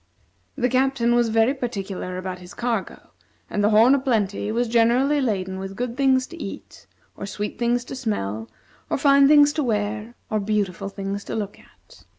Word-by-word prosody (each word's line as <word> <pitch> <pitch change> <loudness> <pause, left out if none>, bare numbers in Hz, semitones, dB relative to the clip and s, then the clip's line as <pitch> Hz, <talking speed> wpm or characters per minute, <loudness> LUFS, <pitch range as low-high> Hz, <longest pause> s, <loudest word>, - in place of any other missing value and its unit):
The 250 -3 +1
Captain 255 -2 +2
was 240 -1 +3
very 225 +4 +3
particular 200 -8 -4
about 185 0 -5
his 180 0 -12
cargo, 235 -5 -3 0.4
and 205 - 0
the 205 - +4
"Horn 225 +5 +6
o' 280 - +3
Plenty" 210 -5 0
was 240 +2 0
generally 240 +5 +3
laden 190 -6 -2
with 195 0 -6
good 240 +1 -3
things 265 -1 +3
to 340 +3 -11
eat, - - -9 0.3
or 200 - -6
sweet 205 +1 -5
things 240 0 +1
to 265 - -7
smell, 110 - -3 0.4
or - - 0
fine 280 0 +5
things 290 0 +6
to 305 - -1
wear, 215 0 -2 0.2
or 215 - +1
beautiful 195 -2 -1
things 200 0 -5
to - - -5
look 205 -2 -4
at. - - -21
225 Hz, 180 wpm, -23 LUFS, 200-255 Hz, 0.4 s, Horn